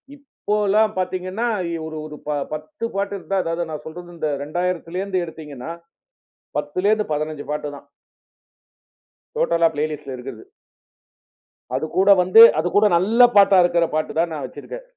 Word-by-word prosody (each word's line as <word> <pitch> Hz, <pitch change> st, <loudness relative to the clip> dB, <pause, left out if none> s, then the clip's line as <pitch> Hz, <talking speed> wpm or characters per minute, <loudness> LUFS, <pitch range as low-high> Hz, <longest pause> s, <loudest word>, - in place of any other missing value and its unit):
இப்போலாம் 210 Hz, -6 st, 0 dB
பாத்தீங்கனா 185 Hz, +4 st, -2 dB, 0.3 s
எ -, -, -2 dB
ஒரு 160 Hz, 0 st, -7 dB
ஒரு 150 Hz, -1 st, -9 dB, 0.4 s
10 155 Hz, +8 st, -6 dB
பாட்டு 200 Hz, 0 st, -2 dB
இருந்தா, 195 Hz, +1 st, -3 dB
அதாவது 165 Hz, +1 st, -2 dB
நான் 155 Hz, -, -6 dB
சொல்றது 175 Hz, +2 st, -10 dB
இந்த 155 Hz, -2 st, -2 dB
2000ல 175 Hz, +2 st, -3 dB
இருந்து 190 Hz, -2 st, -1 dB
எடுத்தீங்கனா, 155 Hz, -3 st, -9 dB, 0.9 s
10லேருந்து 190 Hz, +9 st, 0 dB
15 150 Hz, -1 st, -3 dB
பாட்டுதான். 145 Hz, -1 st, -5 dB, 1.5 s
டோட்டலா 170 Hz, -, +3 dB
பிளேலிஸ்ட்ல 150 Hz, -2 st, -4 dB
இருக்றது. 125 Hz, -2 st, -9 dB, 1.3 s
அதுகூட 160 Hz, +8 st, +1 dB
வந்து 185 Hz, +5 st, +7 dB, 0.2 s
அதுகூட 180 Hz, +6 st, +2 dB
நல்ல 225 Hz, +7 st, +5 dB
பாட்டா 200 Hz, -2 st, +6 dB
இருக்கற 175 Hz, -1 st, +2 dB
பாட்டு 155 Hz, -, -1 dB
தான் 170 Hz, 0 st, +1 dB
நான் 145 Hz, -4 st, -4 dB
வச்சிருக்கேன். 145 Hz, -, -9 dB
170 Hz, 125 wpm, -21 LUFS, 155-195 Hz, 1.5 s, வந்து